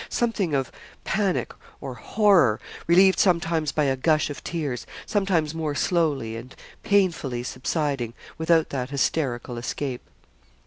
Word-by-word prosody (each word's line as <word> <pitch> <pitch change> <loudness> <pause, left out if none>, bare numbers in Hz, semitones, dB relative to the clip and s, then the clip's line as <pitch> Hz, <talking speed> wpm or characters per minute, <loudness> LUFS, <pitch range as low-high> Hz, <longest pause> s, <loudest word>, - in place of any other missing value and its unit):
Something 205 -10 0
of 135 -2 -1 0.3
panic 195 -3 0 0.3
or 135 -3 -6
horror, 165 - +3 0.3
relieved 190 +3 +5
sometimes 165 -4 +2
by 150 - +1
a 135 -2 +2
gush 155 +3 +1
of 145 - -8
tears 145 -8 -3 0.2
sometimes 180 -7 +1
more 155 -3 -2
slowly 145 - 0
and 120 +3 -9 0.3
painfully 165 -11 +1
subsiding 130 -2 -2 0.2
without 160 0 +2
that 130 -2 -3
hysterical 130 -4 -1
escape. 125 +1 -4
150 Hz, 125 wpm, -25 LUFS, 130-170 Hz, 0.3 s, relieved